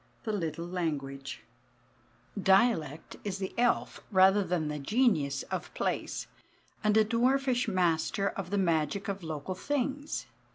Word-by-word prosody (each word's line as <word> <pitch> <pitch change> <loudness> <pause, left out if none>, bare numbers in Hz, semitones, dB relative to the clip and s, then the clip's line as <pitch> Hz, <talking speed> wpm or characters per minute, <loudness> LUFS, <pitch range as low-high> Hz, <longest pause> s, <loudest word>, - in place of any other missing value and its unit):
THE 220 - -2
LITTLE 170 -4 -2
LANGUAGE 145 -6 -4 1.0
Dialect 190 - +2
is 200 -2 -3
the 190 -1 -4
elf 245 0 +1
rather 195 +1 +5
than 175 -3 -1
the 150 0 -3
genius 150 - +2
of - - -3
place, - - -2 0.6
and 210 0 +4
a 220 - +7
dwarfish 250 +2 +2
master 185 0 +1
of 190 -3 -5
the 205 - 0
magic 170 +1 +1
of 200 -1 -3
local 160 +1 -4
things. 285 +6 -2
190 Hz, 130 wpm, -30 LUFS, 160-220 Hz, 1.0 s, a